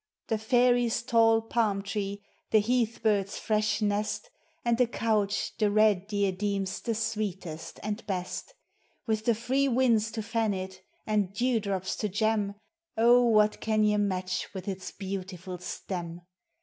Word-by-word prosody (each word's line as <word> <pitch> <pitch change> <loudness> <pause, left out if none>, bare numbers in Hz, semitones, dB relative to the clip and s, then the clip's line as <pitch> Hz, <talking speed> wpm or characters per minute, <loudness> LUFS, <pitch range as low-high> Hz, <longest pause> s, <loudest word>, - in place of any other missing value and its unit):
The 220 - +1
fairies' 245 +1 +3
tall 225 -2 +4
palm 220 -3 0
tree, 200 0 -4 0.3
the - - +5
heath 230 +1 +1
bird's 200 -3 +1
fresh 215 0 0
nest, 210 - -1 0.3
And 235 0 +2
the 250 - +4
couch 210 -3 0
the 210 -2 +3
red 205 -2 +3
deer 200 -2 +1
deems 195 0 -2
the 230 - -2
sweetest 195 -7 -4
and 210 +1 -3
best; 190 - -4 0.5
With 220 -2 -1
the 235 - +3
free 265 +5 +1
winds 235 -4 +3
to 220 - -3
fan 220 -1 0
it, 190 0 -6 0.2
and 210 -3 +1
dew 245 +1 +2
drops 195 -2 -2
to 210 - -1
gem, 210 0 0 0.4
Oh, 240 +2 +6
what 215 -2 +3
can 215 -1 +2
ye 210 0 +3
match 185 -2 -1
with 190 0 -6
its 190 -2 -4
beautiful 185 -2 -6
stem? 175 -1 -5
210 Hz, 150 wpm, -28 LUFS, 195-225 Hz, 0.5 s, Oh